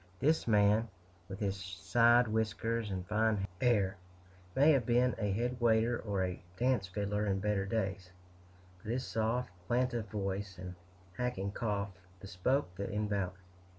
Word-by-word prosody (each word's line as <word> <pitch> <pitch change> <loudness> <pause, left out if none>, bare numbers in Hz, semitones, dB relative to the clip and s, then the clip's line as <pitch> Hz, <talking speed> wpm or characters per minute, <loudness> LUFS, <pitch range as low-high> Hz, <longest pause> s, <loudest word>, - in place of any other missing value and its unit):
This 155 0 +2
man, 105 +1 +4 0.4
with 95 +1 -6
his 100 -2 0
side 100 +6 +3
whiskers 110 0 -1
and 95 -2 -3
fine 105 -1 +1 0.2
air, 105 -6 +2 0.6
may 145 +4 +6
have 135 -5 +3
been 120 +2 +3
a 105 -2 0
head 120 +4 -1
waiter 115 +1 +3
or 100 -3 -1
a 90 -1 -3 0.2
dance 125 -5 +1
fiddler 105 +2 -1
in 95 -1 +1
better 100 -1 0
days; 95 -3 -2 0.7
but 105 - -4
his 125 +1 -1
soft, 115 +1 -1 0.2
plaintive 120 -2 0
voice, 100 -2 -3
and 90 0 -7 0.4
hacking 120 -6 -2
cough, 100 -2 -2 0.3
bespoke 100 +4 -1
the 100 - -3
invalid. 100 -3 -1
105 Hz, 145 wpm, -33 LUFS, 95-120 Hz, 0.7 s, may